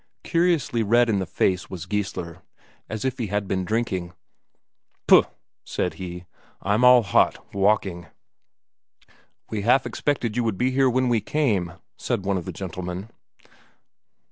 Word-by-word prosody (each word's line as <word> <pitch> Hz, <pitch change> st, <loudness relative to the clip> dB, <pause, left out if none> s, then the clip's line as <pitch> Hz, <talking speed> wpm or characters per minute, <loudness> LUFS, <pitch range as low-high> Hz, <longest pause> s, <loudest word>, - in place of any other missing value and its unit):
Curiously 165 Hz, -9 st, +1 dB
red 120 Hz, +3 st, +3 dB
in 100 Hz, -3 st, +1 dB
the 95 Hz, -, -3 dB
face 90 Hz, +3 st, 0 dB
was 90 Hz, -2 st, -7 dB
Geissler, 90 Hz, -3 st, -4 dB, 0.5 s
as 110 Hz, +3 st, -4 dB
if 130 Hz, -1 st, -2 dB
he 115 Hz, -, -1 dB
had 100 Hz, 0 st, -2 dB
been 95 Hz, -1 st, -1 dB
drinking. 95 Hz, -4 st, -2 dB, 0.9 s
"Puh!" -, -, +7 dB, 0.4 s
said 90 Hz, -, -2 dB
he. 90 Hz, -1 st, -7 dB, 0.3 s
"I'm 105 Hz, +5 st, +1 dB
all 125 Hz, -1 st, +7 dB
hot, 90 Hz, -, +1 dB
walking." 100 Hz, -3 st, +1 dB, 1.4 s
"We 110 Hz, -2 st, -2 dB
half 125 Hz, +5 st, +3 dB
expected 125 Hz, -7 st, -2 dB
you 120 Hz, -, +1 dB
would 110 Hz, -4 st, -1 dB
be 125 Hz, +4 st, +1 dB
here 135 Hz, 0 st, +3 dB
when 130 Hz, +1 st, +1 dB
we 120 Hz, -3 st, +2 dB
came," 105 Hz, -, 0 dB, 0.3 s
said 95 Hz, -, -2 dB
one 100 Hz, -1 st, +1 dB
of 85 Hz, -, -9 dB
the -, -, -4 dB
gentlemen. 90 Hz, +2 st, -6 dB
105 Hz, 145 wpm, -24 LUFS, 95-120 Hz, 1.4 s, Puh